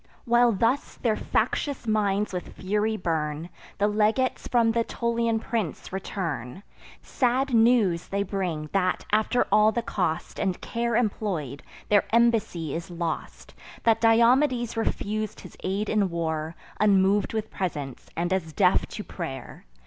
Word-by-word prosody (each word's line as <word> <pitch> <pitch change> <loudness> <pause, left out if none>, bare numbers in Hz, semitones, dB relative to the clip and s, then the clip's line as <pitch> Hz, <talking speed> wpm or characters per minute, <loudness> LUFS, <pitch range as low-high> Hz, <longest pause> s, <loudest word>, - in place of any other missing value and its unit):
While 240 0 +4
thus 230 +8 0
their 225 -3 0
factious 280 +3 -1
minds 210 -2 +1
with 180 - -5
fury 210 +3 0
burn, 160 -2 -2 0.3
The 205 - +2
legates 215 +5 +1
from 230 -2 +3
th' - - -2
Aetolian 235 0 0
prince 220 -7 -4
return: 170 - -4 0.4
Sad 260 +1 0
news 225 -7 +3
they 200 +1 -1
bring, 180 -6 -3
that, 185 -2 +1
after 215 +3 +2
all 210 +1 +5
the 235 +1 -2
cost 175 -7 -2
And 185 -2 -1
care 235 0 -2
employ'd, 195 - -1 0.3
their 205 -1 +4
embassy 225 -9 +2
is 170 +2 -5
lost; 170 -2 -5 0.3
That 225 -1 +3
Diomedes 240 +2 +4
refus'd 215 -1 -2
his - - -12
aid 195 +3 -1
in 205 -3 +1
war, 160 -1 -3 0.2
Unmov'd 200 0 +3
with 220 -1 -3
presents, 145 -8 -4
and 175 +2 0
as 160 -4 -2
deaf 185 0 +3
to 210 - -7
pray'r. 135 -11 -7
205 Hz, 140 wpm, -26 LUFS, 175-230 Hz, 0.4 s, all